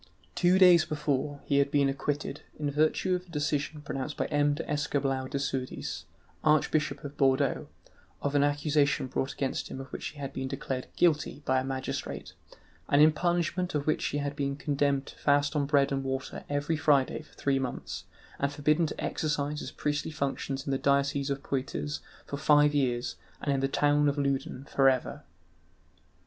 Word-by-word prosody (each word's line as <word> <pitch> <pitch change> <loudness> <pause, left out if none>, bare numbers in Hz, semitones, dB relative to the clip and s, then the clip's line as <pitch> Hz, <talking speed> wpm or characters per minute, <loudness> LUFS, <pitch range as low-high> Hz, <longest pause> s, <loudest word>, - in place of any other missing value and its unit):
Two 180 +1 +4
days 180 -3 +7
before, 145 -1 -2
he 140 -1 +2
had 140 0 +3
been 140 -1 +3
acquitted, 140 +1 -2 0.2
in 145 -1 -1
virtue 155 +5 +2
of 180 0 -2
a - - -20
decision 150 -1 -2
pronounced 140 +1 -4
by - - 0
M. 145 -1 +2
d'Escoubleau 145 -3 -1
de 140 - -3
Sourdis, 135 -2 -3 0.4
Archbishop 150 -1 +2
of 145 0 -7
Bordeaux, 135 -1 +2 0.5
of 145 - -2
an 145 -1 +4
accusation 145 -1 +2
brought 130 +1 -2
against 135 -2 -2
him - - -6
of 135 - -6
which - - -4
he - - -9
had 140 -2 -5
been 130 0 -3
declared 130 -1 -4
guilty 155 -3 +1
by 130 0 +3
a - - -2
magistrate, 130 0 -4 0.6
and 140 - +4
in 155 +1 +8
punishment 175 +2 0
of 145 -1 0
which 155 - +1
he 145 - -2
had 145 0 -2
been 140 -1 -1
condemned 140 -1 0
to - - -13
fast 145 +1 +2
on 145 -2 +1
bread 140 -1 +3
and 135 0 -1
water 135 0 -4
every 145 +3 0
Friday 145 -2 +2
for 155 - -20
three 135 -1 +1
months, 130 -2 -4 0.3
and 140 0 +1
forbidden 150 +3 +2
to - - -7
exercise 150 -1 -1
his - - -5
priestly 150 +1 -2
functions 140 -2 -3
in 140 - -2
the 135 - 0
diocese 140 0 +1
of 140 0 -2
Poitiers 75 - -3 0.3
for 140 - -5
five 150 0 +5
years 125 -4 0 0.2
and 140 - 0
in 135 - +1
the 135 - +1
town 145 +1 +3
of 140 - -2
Loudun 140 -2 -1
for 135 -1 +4
ever. 130 -1 -1
145 Hz, 185 wpm, -29 LUFS, 135-150 Hz, 0.6 s, in